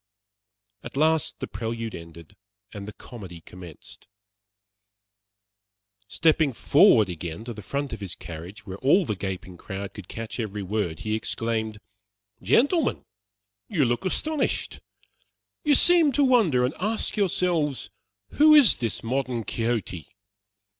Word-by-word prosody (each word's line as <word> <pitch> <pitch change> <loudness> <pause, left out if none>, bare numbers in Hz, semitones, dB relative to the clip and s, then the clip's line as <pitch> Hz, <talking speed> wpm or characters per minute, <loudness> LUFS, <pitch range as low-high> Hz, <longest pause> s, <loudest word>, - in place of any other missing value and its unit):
At - - -9
last 160 +1 +2
the - - -3
prelude 115 +1 -4
ended, 85 +3 -11 0.4
and 100 -1 -7
the - - -6
comedy 95 -9 -11
commenced. 90 -1 -13 2.0
Stepping 155 +3 +2
forward 120 - +5
again 85 +2 -6
to 120 - -5
the 105 - -9
front 140 +6 -3
of - - -6
his 100 -4 -5
carriage 85 +7 -9
where 95 -1 -7
all 155 +8 +4
the 105 - -2
gaping 95 -2 -6
crowd 95 +2 -6
could 105 -4 -10
catch 115 +3 -6
every 105 -3 -3
word, 95 -5 -2
he 110 - -2
exclaimed: 110 -1 -2 0.6
"Gentlemen, 285 +2 +2 0.6
you 155 -9 +2
look 120 +5 0
astonished! 300 - -1 0.8
You 295 -1 +4
seem 335 -1 +5
to 285 - +3
wonder 205 - +4
and 130 - -2
ask 215 +3 -1
yourselves 175 - 0 0.4
who 305 +1 +6
is 285 -6 +6
this 115 -5 -3
modern 125 -1 -2
Quixote. 115 - -3
115 Hz, 130 wpm, -25 LUFS, 100-160 Hz, 2.0 s, who